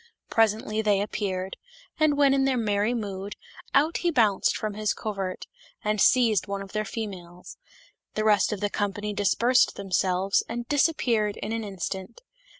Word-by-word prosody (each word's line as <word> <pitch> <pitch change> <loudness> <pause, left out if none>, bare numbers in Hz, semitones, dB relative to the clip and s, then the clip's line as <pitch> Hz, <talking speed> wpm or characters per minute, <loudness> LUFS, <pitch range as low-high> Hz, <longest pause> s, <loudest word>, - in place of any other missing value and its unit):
Presently 220 -1 +2
they 205 -2 +2
appeared, 195 -2 -3 0.4
and 305 -2 +3
when 280 -2 +5
in 270 0 +2
their 265 -2 +1
merry 210 +1 +1
mood, 200 -3 -5 0.4
out 305 +5 +3
he 350 - 0
bounced 220 - +2
from 215 -1 -3
his 210 0 -1
covert, 195 -4 -4 0.4
and 210 -1 0
seized 225 -7 +4
one 200 0 -3
of 195 - -12
their 215 0 -2
females; 180 -6 -7 0.6
the 215 - 0
rest 210 -2 +4
of 210 - -4
the 205 - 0
company 205 0 -2
dis 200 -1 +1
persed 250 +2 +3
themselves, 190 0 +1
and 235 +1 -4
disappeared 245 -8 +1
in 210 - -5
an 225 0 -2
instant. 190 +1 -6
210 Hz, 160 wpm, -26 LUFS, 195-230 Hz, 0.6 s, when